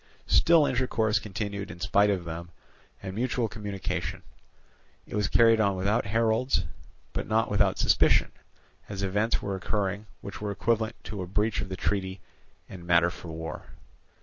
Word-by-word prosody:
Still 165 -3 +5
intercourse 115 -5 +1
continued 100 -1 -4
in 85 - -9
spite 100 +4 +3
of 95 -4 -1
them, 85 +1 -6 0.5
and 95 -1 -5
mutual 120 +1 0
communication. 105 -3 -4 0.8
It - - -12
was 105 -1 +1
carried 115 0 +5
on 100 -2 +2
without 100 +4 0
heralds, 115 +4 +2 0.5
but - - -3
not 110 0 +1
without 100 -2 +3
suspicion, - - +4 0.6
as 100 -1 -4
events 105 +4 0
were 100 - -2
occurring 100 +1 -2
which 100 - -8
were 105 - -2
equivalent 110 +2 0
to 100 -3 -5
a 90 - -5
breach 105 +3 0
of 100 - -5
the 95 - -5
treaty 95 -1 -1 0.5
and 90 -3 -10
matter 85 0 +4
for 85 - -10
war. 80 0 -6
100 Hz, 155 wpm, -28 LUFS, 95-110 Hz, 0.8 s, Still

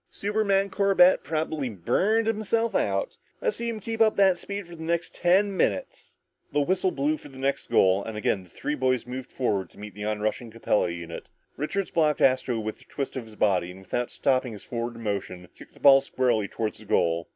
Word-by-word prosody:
"Superman 200 -1 0
Corbett 195 -2 +4
probably 155 -2 -2
burned 185 - +1
himself 225 +1 0
out! - - -1 0.2
Let's 470 -3 -1
see 235 0 -2
him 225 -2 -4
keep 225 +2 -4
up 220 -1 +5
that 190 -3 +4
speed 200 -2 -6
for 175 - -10
the 160 - -11
next 170 +1 -2
ten 195 +3 +2
minutes!" 105 - -2 0.3
The 145 - +2
whistle 185 +5 +1
blew 150 -1 0
for - - -13
the 135 - -14
next 135 +1 -2
goal, 95 +1 +4
and 110 -1 -6
again 105 -2 0
the 90 - -17
three 150 - -4
boys 130 -3 0
moved 125 +1 -7
forward 105 -7 -1
to - - -21
meet 105 -1 -8
the 105 +1 -6
onrushing 110 +2 -2
Capella 110 -4 0
unit. 85 -1 -7 0.3
Richards 185 +7 -2
blocked 155 -3 +2
Astro 130 -3 +2
with 110 0 -5
a - - -18
twist 140 -2 -5
of 130 -3 -4
his 110 -1 -14
body, 90 -5 +1
and 95 +1 -11
without 120 +6 -2
stopping 130 -3 0
his 105 - -9
forward 120 -1 -4
motion, 100 -5 -4
kicked - - -15
the - - -17
ball 135 -1 +7
squarely 125 -6 0
toward 110 0 -3
the 110 - -12
goal. 85 -3 +1
130 Hz, 205 wpm, -26 LUFS, -, 0.3 s, ball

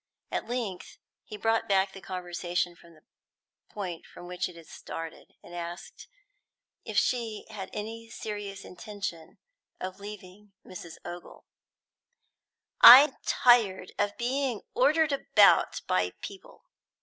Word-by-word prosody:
At - - -3
length 230 -7 -4 0.3
he 210 - -9
brought 225 0 0
back 190 0 +3
the 195 - -10
conversation 175 -1 -3
to 170 - -18
the 155 -2 -21 0.7
point 180 -5 -6
from - - -12
which 180 +1 -3
it 180 - -13
had 165 -1 -13
started, 165 +1 -9
and 175 - -13
asked 175 +1 -8 0.8
if - - -5
she 230 -4 0
had 195 -3 -7
any 225 +2 -7
serious 205 -3 -6
intention 195 -4 -7 0.4
of 185 +1 -6
leaving 200 0 -11
Mrs. 170 -3 -10
Ogle. 175 0 -9 1.4
"I'm 265 +3 +11
tired 220 -7 +3
of 205 0 0
being 250 -2 -1
ordered 325 -10 +3
about 280 - +4
by - - 0
people!" 400 +6 -10
200 Hz, 125 wpm, -28 LUFS, 180-225 Hz, 1.4 s, I'm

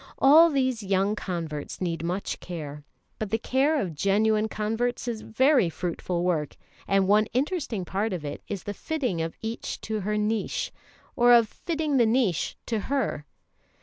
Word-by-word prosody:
All 315 +5 +7
these 260 -5 0
young 195 +1 +1
converts 165 -7 -5
need 170 -3 -2
much 180 +4 -3
care, 150 -4 -7 0.4
but 215 - -3
the 225 - +1
care 275 +6 +1
of 180 -8 -2
genuine 210 +6 +2
converts 225 +4 -2
is 230 -2 -3
very 255 - +3
fruitful 175 +1 -3
work; 160 -5 -1 0.3
and 195 -1 +3
one 210 +2 +4
interesting 265 - -1
part 205 +5 -1
of 175 -5 -4
it 145 - -5
is 200 -3 -5
the 205 - -4
fitting 250 - -2
of 165 0 -3
each 225 +1 -4
to 215 -1 -3
her 210 +2 -1
niche, 220 - -1 0.4
or 240 0 +5
of 235 -2 +6
fitting 315 +1 -2
the 235 -3 +5
niche 220 - +1
to 225 -2 -1
her. 255 - -1
215 Hz, 165 wpm, -26 LUFS, 180-245 Hz, 0.4 s, All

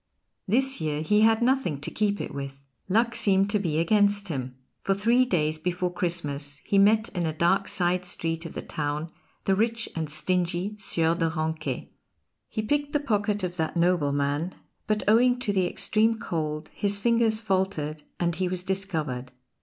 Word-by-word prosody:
This 265 +2 +2
year 155 -1 -1
he 210 +6 +3
had 225 +1 +4
nothing 250 - +1
to - - -3
keep 205 -1 0
it - - -5
with. 140 0 -7 0.2
Luck 230 +4 +3
seemed 195 -1 +2
to 210 - +2
be 165 -6 -1
against 205 +3 +2
him; 130 -4 -4 0.3
for 195 - +1
three 235 +5 +3
days 155 -7 0
before 180 +1 -1
Christmas 145 -5 -2
he 200 - +3
met 215 +3 +4
in 175 -3 -2
a - - 0
dark 190 +4 +2
side 180 0 +1
street 165 -2 -2
of - - -11
the - - -4
town 150 +2 -3 0.3
the 195 - +3
rich 230 +3 0
and 160 -2 -2
stingy 180 +5 -1
Sieur 165 -4 +1
de 165 -1 0
Ranquet. 160 0 -3 0.6
He 215 - -3
picked 290 +5 0
the 295 - +3
pocket 210 -6 0
of 180 -1 -3
that 160 +1 -1
nobleman, 150 -1 +1 0.3
but 215 0 0
owing 245 +3 +5
to 215 -5 -1
the 185 -2 +2
extreme 220 +4 +1
cold 155 -6 -3
his 200 0 0
fingers 230 0 +2
faltered, 190 -8 -1 0.2
and 170 -1 +1
he 185 0 0
was 180 0 -2
discovered. 160 -10 -2
185 Hz, 175 wpm, -26 LUFS, 160-210 Hz, 0.6 s, owing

